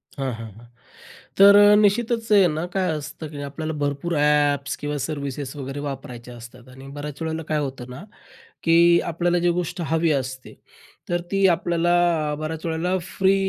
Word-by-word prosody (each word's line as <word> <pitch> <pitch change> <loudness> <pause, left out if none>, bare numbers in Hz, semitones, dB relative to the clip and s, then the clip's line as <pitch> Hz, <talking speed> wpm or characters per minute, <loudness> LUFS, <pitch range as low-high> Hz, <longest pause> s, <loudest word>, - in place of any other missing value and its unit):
हां, 135 -3 -3
हां, 115 -1 -8
हां. 120 - -15 0.7
तर 200 +1 +8 0.2
निश्चितच 225 +2 +1
आहे 200 -3 +6
ना 155 +2 -3
काय 185 -3 +1
असतं 155 +1 -6
की 145 -2 -8
आपल्याला 155 +3 -5
भरपूर 145 +4 -2
ॲप्स 145 -1 +2
किंवा 145 0 -4
सर्व्हिसेस 140 -2 -4
वगैरे 135 0 -6
वापरायच्या 125 -4 -7
असतात 120 +2 -13
आणि 135 +1 -13
बऱ्याच 145 +2 -6
वेळेला 160 0 -3
काय 155 - 0
होतं 130 -3 -5
ना 125 +8 -9 0.6
की 165 0 +3 0.4
आपल्याला 175 +2 0
जी 175 0 +2
गोष्ट 175 0 -3
हवी 165 0 +2
असते, 130 -2 -4 0.6
तर 175 0 0
ती 195 0 +2
आपल्याला 170 -3 +1
बऱ्याच 155 +1 -5
वेळेला 170 +3 -1 0.2
फ्री 190 0 +4
155 Hz, 160 wpm, -23 LUFS, 140-175 Hz, 0.7 s, तर